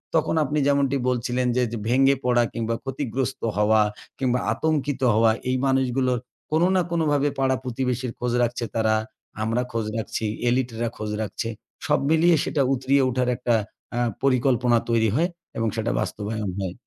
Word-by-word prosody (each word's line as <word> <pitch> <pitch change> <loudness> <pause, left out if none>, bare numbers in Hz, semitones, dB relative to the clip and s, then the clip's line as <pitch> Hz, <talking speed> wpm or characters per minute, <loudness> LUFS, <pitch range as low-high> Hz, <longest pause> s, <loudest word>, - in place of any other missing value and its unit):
তখন 160 0 +2
আপনি 150 +1 -1
যেমনটি 140 -1 +2
বলছিলেন 125 0 0
যে, 125 - +3 0.3
ভেঙে 135 +2 +4
পড়া, 120 -1 +3
কিংবা 115 0 -1
ক্ষতিগ্রস্ত 135 -1 -3 0.2
হওয়া 105 +1 +4 0.4
কিংবা 125 -2 +1
আতঙ্কিত 145 -3 -1
হওয়া, 110 +1 +4 0.2
এই 130 - +1
মানুষগুলো 130 -1 +1 0.4
কোন 155 +1 +2
না 185 - +4
কোনভাবে 145 -4 +2
পাড়া 130 -1 +2
প্রতিবেশীর 125 0 -2
খোঁজ 125 -1 -1
রাখছে 120 0 -1
তারা। 110 -1 +2 0.5
আমরা 115 +3 0
খোঁজ 115 -2 -2
রাখছি, 110 0 -3 0.2
এলিটরা 120 -2 0
খোঁজ 105 0 -4
রাখছে। 110 +1 -3 0.4
সব 150 - +2
মিলিয়ে 165 +1 +5
সেটা 145 - 0
উতরিয়ে 135 +2 +2
উঠার 125 0 0
একটা 120 -2 +1 0.4
আ - - +1 0.2
পরিকল্পনা 125 -2 +3
তৈরি 110 -2 +3
হয় 170 +5 +2 0.3
এবং 115 0 0
সেটা 115 +1 -1
বাস্তবায়ন 105 0 -3
হয়। 95 -2 -3
125 Hz, 155 wpm, -24 LUFS, 115-135 Hz, 0.5 s, মিলিয়ে